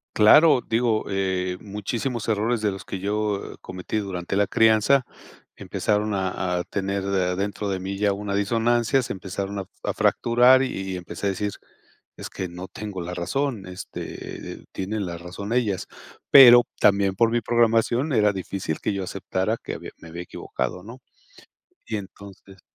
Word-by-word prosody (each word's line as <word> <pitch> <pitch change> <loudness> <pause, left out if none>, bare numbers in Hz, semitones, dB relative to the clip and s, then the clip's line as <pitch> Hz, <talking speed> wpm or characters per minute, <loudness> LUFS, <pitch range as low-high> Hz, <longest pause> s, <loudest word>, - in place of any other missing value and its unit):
Claro, 135 +6 +7
digo, 115 -1 +1
eh, 95 -2 -1
muchísimos 110 +4 -4
errores 110 +1 0
de 105 -1 +1
los 95 -1 -8
que 95 - -5
yo, 105 +1 -2
eh, - - -14
cometí 95 +3 -5
durante 95 -3 -3
la 100 0 +2
crianza, 115 +6 +4 0.5
empezaron 105 0 -1
a 95 -1 -1
a - - -2
tener 100 +1 -3
de 95 -2 0
adentro 100 +3 -2
de 95 -1 -2
mí 95 +1 -4
ya 100 0 +2
una 100 0 -4
disonancia, 115 +5 +2
se - - -4
empezaron 100 +1 -5
a 95 - -5 0.2
a - - -1
fracturar 125 +3 +4
y 130 - 0 0.3
y - - -3
empecé 90 +3 -5
a - - +3
decir: 100 +2 -2 0.7
"Es - - -7
que 95 - -5
no 90 +2 -8
tengo 100 -4 -6
la 90 +1 -5
razón. 110 +3 -2
Este, 90 0 -7
eh, - - -14
tienen 100 +2 -3
la 85 -1 -5
razón 95 +5 -6
ellas". 110 -7 0 0.4
Pero, 120 -3 +10 0.2
también 100 -1 +4
por 115 +3 +3
mi 120 - +1
programación 120 +5 +2
era 105 -3 +3
difícil 95 -4 -4
que - - -1
yo 100 -1 -3
aceptara 95 +3 -2
que - - -5
había - - -8
me 80 - -12
había 85 +2 -6
equivocado, 85 +1 -5
¿no? 115 +6 -11 0.9
Y 110 - -3
entonces 100 -1 -12
100 Hz, 170 wpm, -24 LUFS, 95-115 Hz, 0.9 s, Pero